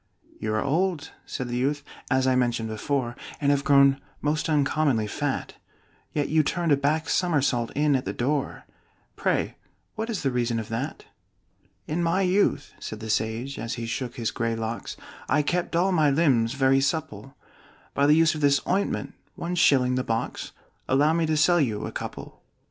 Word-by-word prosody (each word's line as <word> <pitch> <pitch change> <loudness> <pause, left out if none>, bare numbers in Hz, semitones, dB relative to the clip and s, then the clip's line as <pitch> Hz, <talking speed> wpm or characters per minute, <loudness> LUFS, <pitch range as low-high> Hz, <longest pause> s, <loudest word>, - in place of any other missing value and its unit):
"You 110 0 -2
are 110 - 0
old," 170 +2 0 0.2
said 130 -3 -4
the 120 0 -3
youth, 140 +3 0 0.3
"as 130 -1 +2
I 130 -1 +3
mentioned 120 -3 0
before, 120 +2 -2 0.2
And 145 -1 +2
have 140 -1 +1
grown 140 -1 +5 0.2
most 150 +2 -1
uncommonly 145 -5 +2
fat; 105 - -3 0.6
Yet 145 -2 -1
you 155 0 +3
turned 170 +2 -1
a - - +7
back 150 +3 0
somersault 140 -9 +1
in 145 -1 +3
at 130 - -1
the - - -2
door 140 +3 -2 0.5
Pray - - -1 0.4
what 220 +1 -4
is 215 -8 -3
the 135 - +1
reason 120 -1 0
of 110 0 -6
that?" 125 +7 -4 0.8
"In 160 +3 -2
my 170 +3 +2
youth," 180 -6 +1
said 110 - -6
the 110 0 -3
sage, 110 +6 -2
as 115 0 -3
he 115 -1 -5
shook 120 +1 -4
his 115 -2 -2
gray 115 -1 -1
locks, 115 +1 -4 0.3
"I 150 - +3
kept 175 +3 -1
all 180 +3 +3
my 155 -5 +3
limbs 135 -6 +2
very 135 0 +3
supple 135 -4 -3 0.6
By 140 0 +2
the 150 - +6
use 165 0 +4
of 155 - -5
this 140 -1 +4
ointment 195 +2 -1 0.2
one 170 +1 -4
shilling 130 -7 +4
the 130 0 0
box 115 -1 -3 0.4
Allow 145 +4 +4
me 165 -1 +1
to 155 0 +1
sell 175 +3 +4
you 110 -7 -1
a - - -5
couple." - - -7
140 Hz, 180 wpm, -26 LUFS, 120-155 Hz, 0.8 s, a